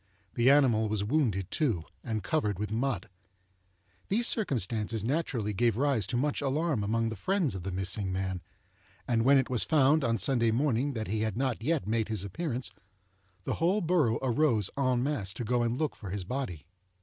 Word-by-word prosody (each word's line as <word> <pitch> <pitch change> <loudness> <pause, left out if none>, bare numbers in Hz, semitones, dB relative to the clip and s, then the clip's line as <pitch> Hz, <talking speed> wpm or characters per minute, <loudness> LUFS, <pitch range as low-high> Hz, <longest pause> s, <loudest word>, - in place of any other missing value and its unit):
The 120 +2 +3
animal 125 -7 +4
was 105 -1 -1
wounded, 105 - 0
too, 115 - 0 0.2
and 110 -3 -3
covered 105 - 0
with 105 +1 -4
mud. 120 +1 -1 1.0
These 230 +5 +1
circumstances 115 - 0
naturally 120 -5 -1
gave 115 +1 +1
rise 130 -7 +1
to 120 - -1
much 145 +3 0
alarm 145 -3 0
among 115 +2 0
the 110 - -5
friends 180 - 0
of 95 - -5
the 95 +2 -4
missing 95 +1 -1
man; 95 -1 -2 0.7
and 115 -2 +2
when 140 +3 +6
it 130 - +2
was 125 - +2
found, 150 0 +3
on 115 -2 +1
Sunday 115 +3 +2
morning, 135 +3 +1
that 110 -3 -4
he 105 +3 -1
had 110 -1 -2
not 130 -4 -1
yet 155 +4 0
made 110 +1 0
his 110 -3 -2
appearance, 125 - -4 0.7
the - - -2
whole 185 +5 +3
borough 160 - +2
arose 120 -6 +2
en 130 -3 +1
masse 115 -9 -2
to 120 - -4
go 120 +2 +1
and 120 +1 0
look 155 -1 -1
for 100 - -8
his 100 0 -3
body. 90 - -4
120 Hz, 185 wpm, -29 LUFS, 105-140 Hz, 1.0 s, when